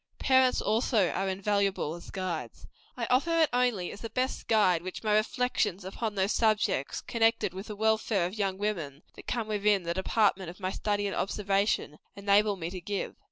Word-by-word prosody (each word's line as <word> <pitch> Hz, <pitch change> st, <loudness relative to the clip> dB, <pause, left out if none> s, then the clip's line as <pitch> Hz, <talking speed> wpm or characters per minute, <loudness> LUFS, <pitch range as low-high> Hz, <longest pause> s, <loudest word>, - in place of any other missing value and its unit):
Parents, 260 Hz, -1 st, +3 dB
also, 215 Hz, -3 st, +2 dB
are 195 Hz, +1 st, -1 dB
invaluable 195 Hz, -3 st, 0 dB
as 170 Hz, -, -10 dB
guides. 170 Hz, -11 st, -5 dB, 0.3 s
I 235 Hz, -, -1 dB
offer 330 Hz, +7 st, +2 dB
it 320 Hz, -2 st, +4 dB
only 245 Hz, -8 st, +1 dB
as -, -, -10 dB
the 230 Hz, -, -5 dB
best 255 Hz, +2 st, -2 dB
guide 190 Hz, -6 st, +3 dB
which 185 Hz, +4 st, -7 dB
my 215 Hz, -1 st, +1 dB
reflections 215 Hz, -4 st, 0 dB
upon 210 Hz, +3 st, -4 dB
those 195 Hz, +1 st, +1 dB
subjects, 215 Hz, -, +1 dB
connected 225 Hz, -4 st, +1 dB
with 190 Hz, +3 st, -7 dB
the 210 Hz, -, -6 dB
welfare 220 Hz, -3 st, +1 dB
of 180 Hz, -, -4 dB
young 195 Hz, -3 st, -1 dB
women, 170 Hz, -9 st, -3 dB
that -, -, -14 dB
come 235 Hz, -2 st, -1 dB
within 205 Hz, -2 st, +2 dB
the 170 Hz, 0 st, -2 dB
department 190 Hz, -1 st, +1 dB
of 180 Hz, -, -11 dB
my 185 Hz, -1 st, -2 dB
study 205 Hz, 0 st, -1 dB
and 200 Hz, -, -2 dB
observation, 195 Hz, -6 st, 0 dB, 0.2 s
enable 200 Hz, +1 st, +3 dB
me 170 Hz, -2 st, -5 dB
to 185 Hz, -1 st, -6 dB
give. 200 Hz, +3 st, -3 dB
205 Hz, 185 wpm, -29 LUFS, 185-220 Hz, 0.3 s, it